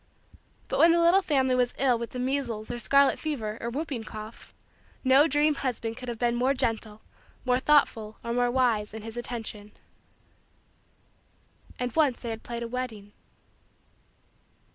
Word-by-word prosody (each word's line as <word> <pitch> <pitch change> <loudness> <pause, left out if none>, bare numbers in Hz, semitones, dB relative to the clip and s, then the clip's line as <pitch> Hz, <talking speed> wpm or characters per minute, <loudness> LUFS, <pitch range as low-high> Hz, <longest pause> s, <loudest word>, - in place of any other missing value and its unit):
But - - -2
when 335 - +7
the 340 - +3
little 340 +3 +5
family 265 -7 +1
was 250 -1 +1
ill 255 -3 +2
with 235 - -4
the - - -8
measles 250 -4 -2
or 240 - -4
scarlet 275 +3 +4
fever 230 -9 -3
or 235 - -3
whooping 270 -2 -4
cough 215 +1 -9 0.5
no 270 +3 +6
dream 295 +1 +3
husband 240 -5 -3
could 250 0 -7
have 235 - -4
been 240 +1 +1
more 255 +3 +1
gentle, 220 -3 -1 0.4
more 250 0 +2
thoughtful, 245 -7 +2
or 235 - -3
more 245 0 +2
wise, 235 -5 +1
in 220 - -7
his 225 0 -7
attention. 225 -3 -6 2.0
And 250 -2 -3
once 290 -6 +2
they 235 - -5
had 225 0 -6
played 235 0 -5
a - - -4
wedding. 230 -5 -5
245 Hz, 160 wpm, -27 LUFS, 225-270 Hz, 2.0 s, when